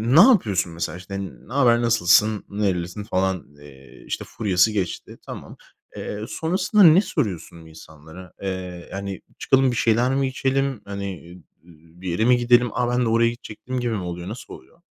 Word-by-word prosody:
ne 170 - +10
yapıyorsun 105 - +4
mesela 85 0 -4
işte 95 +1 -7
ne 100 +5 -10
haber, 120 -4 +4
nasılsın, 105 -1 +3
nerelisin 95 -1 -2
falan, 95 -3 -1
eee, 70 -2 -15
işte - - -4
furyası 100 0 +1
geçti, 95 -5 -4
tamam. - - -9 0.4
Eee, 105 +1 -5
sonrasında 185 +5 +2
ne 170 +3 +8
soruyorsun 95 - -3
insanlara? 80 +2 -13
Eee, 90 -2 -5
hani, 100 -1 -5 0.2
çıkalım 135 -1 +3
bir - - -3
şeyler 120 +4 +2
mi 135 -1 +1
içelim? 135 -1 -1
Hani, 100 0 -5 0.2
ııı, 85 -1 -14 0.3
ııı, 85 +3 -22
bir 95 - -4
yere 110 +7 0
mi 125 0 +5
gidelim? 120 0 +4
"A, 125 0 0
ben 125 0 +1
de - - +1
oraya 115 +1 +3
gidecektim." 120 +2 -6
gibi 120 -1 -1
mi 100 - -2
oluyor? 90 0 -6
Nasıl 115 0 -8
oluyor? 170 - -15
105 Hz, 175 wpm, -23 LUFS, 90-125 Hz, 0.4 s, ne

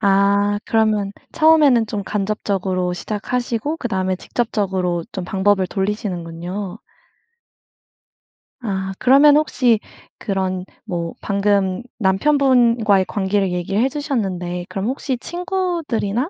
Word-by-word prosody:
아 200 0 +3
그러면 215 -3 +1 0.2
처음에는 300 -8 +5
좀 210 -1 -3
간접적으로 195 -3 -1
시작하시고 240 - -2
그다음에 190 - -1
직접적으로 190 -6 -1
좀 190 - -4
방법을 190 0 +1
돌리시는군요. 190 -1 -4 1.8
아 190 -5 -3
그러면 285 +3 +6
혹시 250 -7 +2 0.4
그런 190 -3 -2 0.2
뭐 170 -2 -3
방금 200 0 +1 0.2
남편분과의 230 -2 +3
관계를 195 -1 0
얘기해 195 +7 0
주셨는데 190 - -3
그럼 195 0 -3
혹시 260 0 -2
친구들이나 340 - -2
205 Hz, 270 characters per minute, -20 LUFS, 190-245 Hz, 1.8 s, 그러면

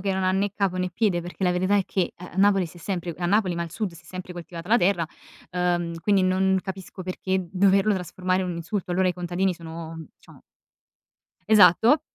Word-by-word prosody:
che 195 0 -1
non 190 - -1
ha 185 - +2
né 200 +2 +1
capo 195 -3 0
né 185 - 0
piede, 185 -3 +1
perché 175 +2 -5
la 180 - +3
verità 185 +3 +2
è 195 - +2
che 185 -3 -1
a 180 +1 -10
a - - -12
Napoli 195 -1 +4
si 165 - -14
è - - -16
sempre 175 -2 -3
a 175 - -1
Napoli 195 -1 +2
ma 170 - -1
al 165 - -6
sud, 200 -1 -3
si 170 - -14
è - - -23
sempre 185 -1 -7
coltivata 175 0 -8
la 235 - +5
terra, 175 -2 +2 0.5
uhm, 175 -2 0
quindi 200 +1 +3
non 190 +1 +2
capisco 190 -1 -7
perché 185 +1 -2
doverlo 195 +2 +4
trasformare 185 0 -1
in 185 - -3
un 170 - -4
insulto, 175 +3 -4
allora 185 +1 +2
i - - +1
contadini 180 +2 -1
sono, 165 -1 -8 0.2
diciamo - - -19 1.0
esatto 215 - +6
185 Hz, 220 wpm, -25 LUFS, 175-195 Hz, 1.0 s, esatto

